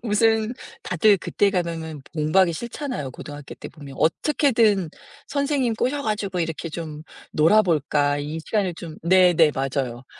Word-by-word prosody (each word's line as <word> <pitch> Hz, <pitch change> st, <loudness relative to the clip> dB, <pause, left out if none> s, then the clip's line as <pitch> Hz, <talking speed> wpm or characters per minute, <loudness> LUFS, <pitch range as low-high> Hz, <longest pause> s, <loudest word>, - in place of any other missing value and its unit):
무슨 220 Hz, 0 st, +2 dB, 0.3 s
다들 200 Hz, +4 st, +3 dB
그때 200 Hz, +3 st, +1 dB
가면은 165 Hz, -4 st, -3 dB
공부하기 170 Hz, +4 st, +3 dB
싫잖아요 235 Hz, -, -5 dB
고등학교 145 Hz, +2 st, -9 dB
때 -, -, -9 dB
보면. 145 Hz, -4 st, -12 dB
어떻게든 220 Hz, -, +2 dB, 0.4 s
선생님 280 Hz, -4 st, 0 dB
꼬셔 270 Hz, +6 st, -1 dB
가지고 205 Hz, -5 st, -2 dB
이렇게 165 Hz, 0 st, -3 dB
좀 155 Hz, -2 st, -7 dB, 0.3 s
놀아볼까 150 Hz, -5 st, +3 dB
이 150 Hz, +3 st, -4 dB
시간을 195 Hz, -5 st, 0 dB
좀 165 Hz, -1 st, -9 dB
네네. 175 Hz, -3 st, +5 dB
맞아요. 130 Hz, -2 st, -2 dB
175 Hz, 320 characters per minute, -23 LUFS, 155-215 Hz, 0.4 s, 네네